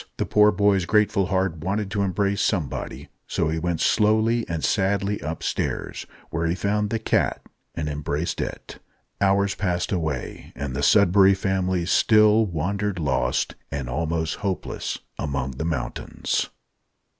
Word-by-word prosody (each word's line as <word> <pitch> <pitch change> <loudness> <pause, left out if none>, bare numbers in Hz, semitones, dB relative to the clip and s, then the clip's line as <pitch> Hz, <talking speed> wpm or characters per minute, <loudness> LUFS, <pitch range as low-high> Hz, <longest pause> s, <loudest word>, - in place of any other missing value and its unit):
The - - 0
poor 105 0 +5
boy's 100 -2 +2
grateful 100 -1 +2
heart 95 -4 0
wanted 95 +5 -2
to 100 -2 0
embrace 100 +1 0
somebody; 85 - -2 0.2
so - - 0
he 80 +1 -1
went 85 -1 -1
slowly 110 +2 +2
and 80 -3 -3
sadly 100 +5 +1
upstairs, 80 +2 -3 0.2
where 80 +1 -1
he 85 - 0
found 105 +2 0
the 115 - 0
cat, 110 - 0 0.3
and 75 - -2
embraced 75 +2 -2
it. - - -6 0.4
Hours 100 0 +3
passed 90 -3 -1
away, 80 -8 -3
and 70 -2 -4
the 70 - -2
Sudberry 100 +3 +5
Family 95 -2 0
still 110 +3 +4
wandered 100 +4 -2
lost, 65 -5 0 0.2
and 70 -3 -3
almost 80 +4 -1
hopeless, 95 -3 -3 0.2
among 70 -2 -2
the 70 +5 -5
mountains. 75 -7 -2
95 Hz, 140 wpm, -24 LUFS, 80-100 Hz, 0.4 s, poor